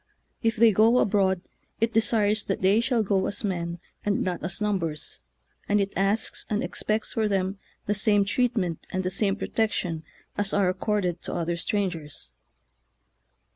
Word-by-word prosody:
If 225 Hz, 0 st, +1 dB
they 230 Hz, 0 st, +6 dB
go 220 Hz, +4 st, +5 dB
abroad, 190 Hz, -4 st, +2 dB, 0.4 s
it 225 Hz, 0 st, +1 dB
desires 215 Hz, -1 st, +2 dB
that 195 Hz, -, -2 dB
they 200 Hz, +4 st, +5 dB
shall 240 Hz, -2 st, +1 dB
go 195 Hz, -2 st, +1 dB
as 200 Hz, -, -1 dB
men, 170 Hz, -4 st, -2 dB, 0.3 s
and 205 Hz, -1 st, +1 dB
not 180 Hz, -2 st, -3 dB
as 185 Hz, -, -2 dB
numbers, 185 Hz, -8 st, -2 dB, 0.5 s
and 205 Hz, 0 st, +4 dB
it 200 Hz, 0 st, -1 dB
asks 195 Hz, +3 st, 0 dB
and 210 Hz, 0 st, 0 dB
expects 215 Hz, +1 st, -1 dB
for 220 Hz, -1 st, +1 dB
them 195 Hz, -1 st, -1 dB, 0.3 s
the 205 Hz, -, +1 dB
same 205 Hz, -1 st, +3 dB
treat 245 Hz, +3 st, +1 dB
ment 175 Hz, -5 st, -2 dB
and 185 Hz, 0 st, -2 dB
the 185 Hz, -, -1 dB
same 195 Hz, 0 st, +1 dB
protection 190 Hz, -7 st, -1 dB, 0.4 s
as 205 Hz, -1 st, 0 dB
are 195 Hz, -3 st, +3 dB
ac 185 Hz, -, -10 dB
corded 195 Hz, -5 st, 0 dB
to -, -, -5 dB
other 170 Hz, 0 st, -1 dB
strangers. 165 Hz, -, -2 dB
200 Hz, 170 wpm, -26 LUFS, 185-215 Hz, 0.5 s, they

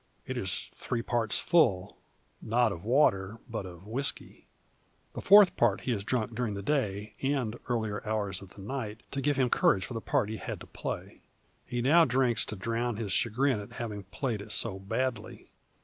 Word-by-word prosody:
It -, -, -4 dB
is -, -, -1 dB
three 115 Hz, -2 st, -3 dB
parts 115 Hz, -3 st, +1 dB
full, 110 Hz, -, +2 dB, 0.5 s
not 115 Hz, 0 st, +2 dB
of 85 Hz, -3 st, -6 dB
water, 110 Hz, -5 st, +2 dB
but 110 Hz, -5 st, -4 dB
of 90 Hz, +1 st, -12 dB
whisky. 125 Hz, +6 st, -4 dB, 0.7 s
The -, -, -5 dB
fourth 205 Hz, -1 st, +7 dB
part 110 Hz, -4 st, +2 dB
he 130 Hz, -, -2 dB
has 100 Hz, -4 st, -1 dB
drunk 115 Hz, 0 st, -1 dB
during 115 Hz, -3 st, -2 dB
the 100 Hz, -, -5 dB
day, 105 Hz, -6 st, -1 dB
and 135 Hz, -5 st, 0 dB
earlier 110 Hz, -4 st, -1 dB
hours 105 Hz, -4 st, -2 dB
of 95 Hz, -2 st, -13 dB
the 100 Hz, -, -10 dB
night, 110 Hz, -2 st, -5 dB
to 140 Hz, -, -2 dB
give 145 Hz, +1 st, +2 dB
him 130 Hz, -2 st, +2 dB
courage 95 Hz, -1 st, +3 dB
for -, -, -7 dB
the 115 Hz, -, -4 dB
part 105 Hz, -, +1 dB
he 110 Hz, -, -4 dB
had -, -, -5 dB
to -, -, -8 dB
play. -, -, -6 dB, 0.5 s
He 120 Hz, -1 st, -2 dB
now 165 Hz, +6 st, +6 dB
drinks 125 Hz, -3 st, +2 dB
to 110 Hz, -, -5 dB
drown 115 Hz, +3 st, -2 dB
his 110 Hz, -4 st, -3 dB
chagrin 120 Hz, +4 st, +2 dB
at 100 Hz, -, -9 dB
having 105 Hz, -4 st, -5 dB
played 110 Hz, +2 st, -3 dB
it 105 Hz, +1 st, -9 dB
so 100 Hz, -4 st, 0 dB
badly. 115 Hz, +3 st, -3 dB
115 Hz, 190 wpm, -30 LUFS, 100-125 Hz, 0.7 s, fourth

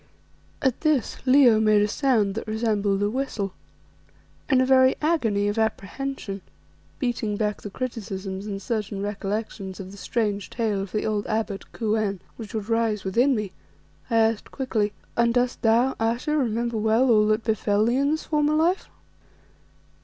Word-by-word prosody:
At 265 Hz, -3 st, +1 dB
this 305 Hz, -8 st, +1 dB
Leo 255 Hz, -4 st, +6 dB
made 215 Hz, -1 st, +4 dB
a -, -, +2 dB
sound 220 Hz, -4 st, +1 dB
that 225 Hz, -, -5 dB
resembled 210 Hz, -3 st, 0 dB
a 205 Hz, -, +2 dB
whistle. 230 Hz, -7 st, -2 dB, 1.0 s
In 265 Hz, -3 st, +4 dB
a 255 Hz, -, +4 dB
very 260 Hz, 0 st, +5 dB
agony 225 Hz, -11 st, +1 dB
of 205 Hz, +2 st, -1 dB
apprehension, 220 Hz, 0 st, -3 dB, 0.6 s
beating 230 Hz, -5 st, -1 dB
back 210 Hz, -1 st, -1 dB
the 205 Hz, -, -6 dB
criticisms 200 Hz, -4 st, -5 dB
and 200 Hz, -2 st, -4 dB
certain 205 Hz, -1 st, -3 dB
recollections 205 Hz, -1 st, -4 dB
of 190 Hz, -1 st, -7 dB
the 200 Hz, -, -11 dB
strange 205 Hz, -4 st, -1 dB
tale 215 Hz, -4 st, -1 dB
of 195 Hz, -, -6 dB
the 215 Hz, -, -1 dB
old 210 Hz, -1 st, -1 dB
abbot, 215 Hz, -3 st, -3 dB
Kou 220 Hz, -1 st, 0 dB
en, 200 Hz, -3 st, -1 dB, 0.2 s
which 220 Hz, -2 st, -8 dB
would 215 Hz, -2 st, -3 dB
rise 225 Hz, -3 st, 0 dB
within 240 Hz, +8 st, +2 dB
me, 210 Hz, -4 st, -3 dB, 0.6 s
I 230 Hz, -, 0 dB
asked 225 Hz, -1 st, +2 dB
quickly 220 Hz, -6 st, -1 dB, 0.2 s
"And 235 Hz, 0 st, +2 dB
dost 245 Hz, 0 st, +1 dB
thou, 235 Hz, +4 st, +3 dB
Ayesha, 235 Hz, +7 st, 0 dB
remember 235 Hz, -4 st, 0 dB
well 220 Hz, +4 st, +3 dB
all 210 Hz, -1 st, +5 dB
that 215 Hz, +1 st, +1 dB
befell 215 Hz, -1 st, +1 dB
thee 240 Hz, +2 st, +2 dB
in 280 Hz, +1 st, +2 dB
this 315 Hz, +1 st, -1 dB
former 300 Hz, 0 st, +1 dB
life?" 340 Hz, +5 st, +1 dB
220 Hz, 165 wpm, -25 LUFS, 205-250 Hz, 1.0 s, Leo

